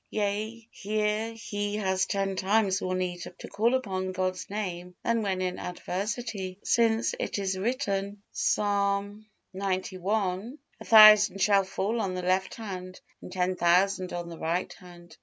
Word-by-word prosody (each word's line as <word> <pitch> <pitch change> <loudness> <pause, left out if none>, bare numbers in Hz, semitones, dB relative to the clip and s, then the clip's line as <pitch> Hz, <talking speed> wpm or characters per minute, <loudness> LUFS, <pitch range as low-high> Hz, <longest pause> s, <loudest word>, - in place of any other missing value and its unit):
Yea, 215 +2 -3
here 215 +2 -1
he 205 -2 -4
has 190 -3 0
ten 195 -1 -1
times 195 0 +1
more 185 0 -1
need 180 -1 -2 0.2
to - - -9
call 230 +5 +1
upon 190 -7 -2
God's 185 0 -3
Name 180 -3 -5
than 230 -1 +1
when 190 -3 -1
in 180 -1 -3
adversity. 195 +1 -4
Since 230 -1 +2
it - - -2
is 195 -1 -1
written, 200 -2 -2
Psalm 200 +1 0 0.3
xci, 190 - -2 0.2
"A - - -10
thousand 215 -2 +8
shall 200 0 +4
fall 205 +4 -2
on 185 -3 -2
the 180 - -4
left 185 +1 0
hand 185 -4 -7 0.2
and - - -10
ten 185 0 0
thousand 180 +2 +2
on 175 0 -4
the 170 -1 -9
right 170 +3 -1
hand." 175 -1 -15
195 Hz, 150 wpm, -28 LUFS, 185-210 Hz, 0.3 s, thousand